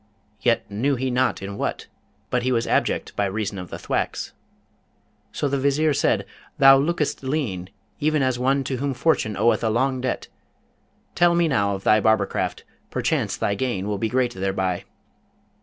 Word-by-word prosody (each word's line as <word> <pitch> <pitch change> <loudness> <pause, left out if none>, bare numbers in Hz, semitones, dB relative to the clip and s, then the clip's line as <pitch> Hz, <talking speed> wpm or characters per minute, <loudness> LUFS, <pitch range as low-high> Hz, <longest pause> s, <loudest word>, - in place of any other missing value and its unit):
Yet 120 -1 +1
knew 125 +8 0
he 130 +1 -2
not 125 -5 +1
in 100 +1 -6
what, - - -2 0.5
but 125 - +1
he 130 +1 0
was 115 -2 +1
abject - - 0
by 100 - +1
reason 100 0 -3
of 90 -2 -8
the - - -6
thwacks. - - -3 1.0
So 145 - -1
the 140 0 0
Vizier 145 +3 +2
said, - - +1 0.3
'Thou 135 0 +8
lookest 150 +1 -1
lean, 130 - -2 0.3
even 155 -1 +2
as 130 -2 0
one 135 +2 +2
to 130 0 -3
whom 140 +1 -2
Fortune 115 - +1
oweth 115 +4 +2
a 110 - +2
long 130 +3 +1
debt. 130 - -2 0.9
Tell 175 0 +4
me 170 -1 +3
now 100 -8 +1
of 95 - -8
thy 110 0 +4
barbercraft: 110 -1 +1 0.3
perchance - - -1
thy 100 - 0
gain 100 -3 -2
will 105 -1 -2
be 110 - 0
great 125 0 +1
thereby?' 95 -2 -2
125 Hz, 175 wpm, -23 LUFS, 100-135 Hz, 1.0 s, Thou